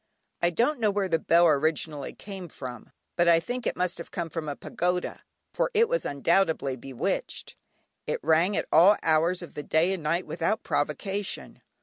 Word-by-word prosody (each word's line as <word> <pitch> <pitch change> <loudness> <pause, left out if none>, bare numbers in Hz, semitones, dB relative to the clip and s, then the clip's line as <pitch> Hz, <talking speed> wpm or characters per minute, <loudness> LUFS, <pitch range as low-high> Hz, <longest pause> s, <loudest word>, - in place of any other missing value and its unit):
I 175 - +4
don't 240 - +1
know 220 -2 +3
where 200 -1 0
the 165 -3 +1
bell 170 +2 +4
originally 155 -1 +1
came 195 -3 -8
from, 125 -6 -9 0.3
but 175 0 +2
I 165 -1 +6
think 245 +8 -4
it - - -1
must 180 -1 -1
have 170 - -8
come 170 -3 -4
from 160 -2 -4
a 145 - -3
pagoda, 180 +4 -2 0.3
for - - +1
it 460 +2 +5
was - - -1
undoubtedly 160 -2 +1
bewitched. 130 0 -3 0.5
It - - -1
rang 165 +6 +3
at - - 0
all 190 +6 +7
hours 165 +3 +2
of 175 - -10
the - - -5
day 160 +5 +2
and 190 - -4
night 165 +4 0
without - - -1
provocation. 200 -1 -2
170 Hz, 185 wpm, -27 LUFS, 155-195 Hz, 0.5 s, all